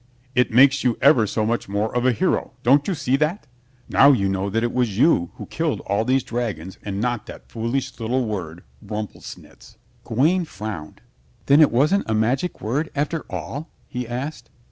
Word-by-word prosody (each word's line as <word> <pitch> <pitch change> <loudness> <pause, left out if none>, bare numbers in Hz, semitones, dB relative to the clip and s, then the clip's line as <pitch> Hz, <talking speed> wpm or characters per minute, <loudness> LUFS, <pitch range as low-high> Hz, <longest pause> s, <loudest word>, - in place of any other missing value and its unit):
"It 125 -1 +3
makes 135 +3 +5
you 125 -3 +1
ever 135 -6 +5
so 110 +2 -1
much 115 -2 -1
more 105 +3 -1
of 125 +1 +2
a - - +5
hero. 115 - 0
Don't 140 +4 +4
you 190 - 0
see 135 -3 0
that? 155 +4 -1 0.4
Now 140 +1 +6
you 100 -8 +2
know 95 +1 -1
that 115 +3 0
it 120 - -1
was 120 -6 0
you 110 - +3
who - - -8
killed - - -2
all 100 +3 0
these 130 +2 +1
dragons 100 -7 -4
and 100 -1 -4
not 120 0 -2
that - - -12
foolish 115 +4 -3
little 120 +3 0
word 90 -6 -5 0.2
'Rumplesnitz.'" 105 0 -8 0.3
Gawaine 165 +10 +1
frowned. 100 - -7 0.4
"Then 140 +3 +6
it 150 - +7
wasn't 150 - +2
a 110 - +1
magic 125 +11 0
word 140 +9 -1
after 150 +3 -2
all?" 150 +4 -6 0.2
he 125 -1 -5
asked. 125 +1 -5
120 Hz, 185 wpm, -22 LUFS, 105-140 Hz, 0.4 s, it